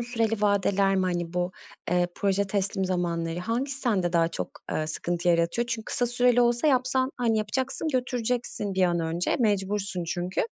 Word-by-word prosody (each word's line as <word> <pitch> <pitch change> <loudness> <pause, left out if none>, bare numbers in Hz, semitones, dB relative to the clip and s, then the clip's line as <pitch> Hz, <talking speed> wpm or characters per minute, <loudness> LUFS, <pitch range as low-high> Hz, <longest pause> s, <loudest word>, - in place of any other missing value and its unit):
süreli 225 -3 -1
vadeler 200 -1 +3
mi, 190 - +2
hani, 175 -1 -2
bu, 180 +1 -1 0.4
eee, 175 0 +3
proje 200 0 +1
teslim 195 -1 -1
zamanları, 170 -2 -1
hangisi 250 +8 -2
sende 190 -8 +1
daha 165 -1 +3
çok, - - -4 0.2
eee, 155 - -1
sıkıntı 175 +2 -2
yaratıyor? 170 +8 +2
Çünkü 230 -2 -3
kısa 245 - 0
süreli 245 0 +3
olsa 240 +3 +2
yapsan, 260 -1 +2
hani, 230 -3 +1
yapacaksın, 260 +8 -2
götüreceksin 245 -6 -1
bir 190 - +2
an 175 -1 +2
önce, 165 +2 0
mecbursun 200 -4 0
çünkü. 175 +2 -2
200 Hz, 165 wpm, -27 LUFS, 175-240 Hz, 0.4 s, vadeler